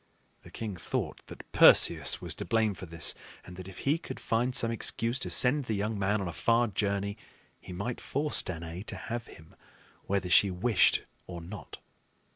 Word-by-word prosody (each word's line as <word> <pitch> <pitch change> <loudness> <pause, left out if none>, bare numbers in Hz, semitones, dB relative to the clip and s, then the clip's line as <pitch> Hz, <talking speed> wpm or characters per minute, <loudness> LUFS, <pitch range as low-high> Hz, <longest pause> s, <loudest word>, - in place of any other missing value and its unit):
The - - -15
king 105 -5 -6
thought - - -4
that - - -12
Perseus - - +6
was - - -3
to - - -6
blame 110 -2 +1
for 95 -1 -10
this, 85 0 +1 0.3
and 90 - -11
that 95 0 -9
if 95 - -11
he 150 +4 +2
could 165 - -8
find 120 +3 -1
some 115 -4 +3
excuse 115 +2 -1
to - - -2
send 135 +2 +3
the 110 - -2
young 105 +1 -2
man 100 +2 0
on 95 - -3
a 85 - -5
far 115 +7 +2
journey, 100 0 -2 0.4
he - - -12
might 100 +7 -5
force 150 +2 0
Danaë 85 +1 -7
to - - -5
have 120 0 -6
him 80 -1 -16 0.5
whether 100 -2 -1
she 100 +3 +5
wished 95 +3 +2 0.2
or 90 -2 -7
not. 90 +3 -10
100 Hz, 190 wpm, -29 LUFS, 90-115 Hz, 0.5 s, Perseus